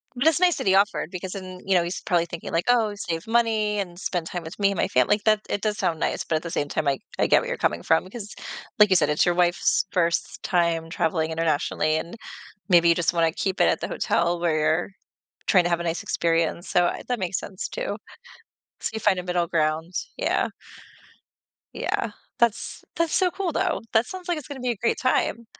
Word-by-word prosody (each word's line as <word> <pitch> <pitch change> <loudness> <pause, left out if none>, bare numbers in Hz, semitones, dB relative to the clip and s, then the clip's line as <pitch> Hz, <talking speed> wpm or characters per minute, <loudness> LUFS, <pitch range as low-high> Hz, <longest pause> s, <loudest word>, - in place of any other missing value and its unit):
But 265 +6 +1
it's 325 +3 +3
nice 355 -2 +4
that - - -3
he 190 - +5
offered 200 -4 +2
because 180 0 -6
then, 185 -2 -8
you 195 - +2
know, 175 - +4
he's 175 +2 -4
probably 175 -2 +1
thinking 170 0 -7
like, 165 +1 0
"Oh, 225 -4 +3
save 170 -5 -4
money 220 -3 +2
and 175 -3 -4
spend 175 -4 -2
time 175 -2 -5
with 160 +5 -9
me 200 0 +3
and 195 - -4
my - - +1
family." 205 - +4
like, 205 - -10
that 215 -1 +3
it 205 - -1
does 210 -1 -1
sound 160 -2 0
nice, - - -1
but 160 - 0
at 155 - 0
the 170 - -5
same 145 - -1
time, 150 0 -2
I 135 -1 +1 0.2
I - - +2
get - - +5
where - - -5
you're - - -2
coming 85 - 0
from, 160 - +3
because, 205 +2 -9 0.5
like 210 - +7
you 185 - +4
said, 150 -3 +2
it's 150 - +3
your 175 -1 +2
wife's 180 +3 +2
1st 170 -2 0
time 170 -2 +1
traveling 160 0 0
internationally, 155 -1 0
and 170 +6 -5 0.5
maybe 170 -1 +6
you 170 - +5
just 170 0 +1
wanna 165 -1 +2
keep 190 +3 -2
it - - +5
at - - +1
the - - -3
hotel 170 0 0
where 170 -2 +1
you're 155 +4 +1 0.6
tryna 180 -3 +4
have 170 -1 +1
a - - -3
nice 170 0 -2
experience, 165 +1 0
so, 175 0 +3
uh, - - -1
that 245 -3 0
makes 185 0 -1
sense 190 -1 -6
too. - - -4 0.8
So - - -2
you 220 - -3
find 200 -3 +3
a - - -2
middle 175 -1 0
ground, 160 +1 0 0.2
yeah. - - +1 1.3
Yeah, - - -2 0.3
that's 235 -2 0
that's 335 -1 0
so 365 -2 +3
cool, 375 -2 -2
though. - - 0
That 225 +2 +4
sounds 370 -1 -8
like 345 -2 0
it's 300 - -8
gonna 285 -3 -7
be 250 -1 0
a - - -3
great 230 +3 0
time. 235 -2 +1
180 Hz, 230 wpm, -25 LUFS, 165-210 Hz, 1.3 s, like